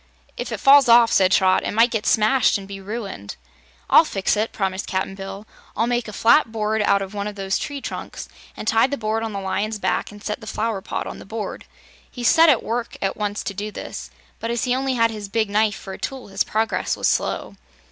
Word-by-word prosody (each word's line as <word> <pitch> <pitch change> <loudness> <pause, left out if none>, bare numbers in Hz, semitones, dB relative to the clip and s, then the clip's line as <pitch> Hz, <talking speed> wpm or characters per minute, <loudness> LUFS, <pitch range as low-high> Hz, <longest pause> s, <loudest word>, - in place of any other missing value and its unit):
"If - - -5
it - - -3
falls 275 -2 +6
off," 235 0 +7
said 185 -1 +4
Trot, 185 0 +4
"it - - -2
might 230 +2 +4
get 220 -2 -2
smashed 220 +3 +3
an' 195 - -9
be 195 0 -8
ruined." 195 - -6 0.5
"I'll - - +7
fix 195 -11 0
it," 215 +2 -1
promised 190 -2 -2
Cap'n 190 0 -2
Bill. 195 +1 -8 0.3
"I'll 225 - +2
make 240 -1 -1
a - - -6
flat 230 +4 +4
board 220 -1 -1
out 200 -1 +2
of 195 +1 -9
one 205 0 -3
of 210 - -6
these 195 -1 -1
tree 285 -1 -5
trunks, - - -6 0.3
an' - - -6
tie 225 +3 +4
the 285 +1 -3
board 220 0 -1
on 225 -1 -3
the 200 - -4
lion's 205 +3 -2
back, 205 - -1
an' 205 - -12
set 210 +2 -5
the 220 - -10
flower 215 -2 -2
pot - - -4
on - - -7
the - - -10
board." 215 +1 -6 0.4
He 245 - -8
set 325 +7 +6
to 290 -6 +6
work 235 +1 -3
at 195 - -1
once 210 -1 -3
to 200 - -4
do 205 +2 -4
this, - - -7 0.3
but 230 - -4
as 235 0 -1
he 250 - +1
only 265 0 0
had 230 -1 +3
his 210 -2 -7
big 215 -1 0
knife 210 0 +2
for 190 - -8
a - - -9
tool 265 -5 -6
his 195 0 0
progress 220 +1 -1
was - - +1
slow. - - -1
215 Hz, 240 wpm, -22 LUFS, 200-230 Hz, 0.5 s, off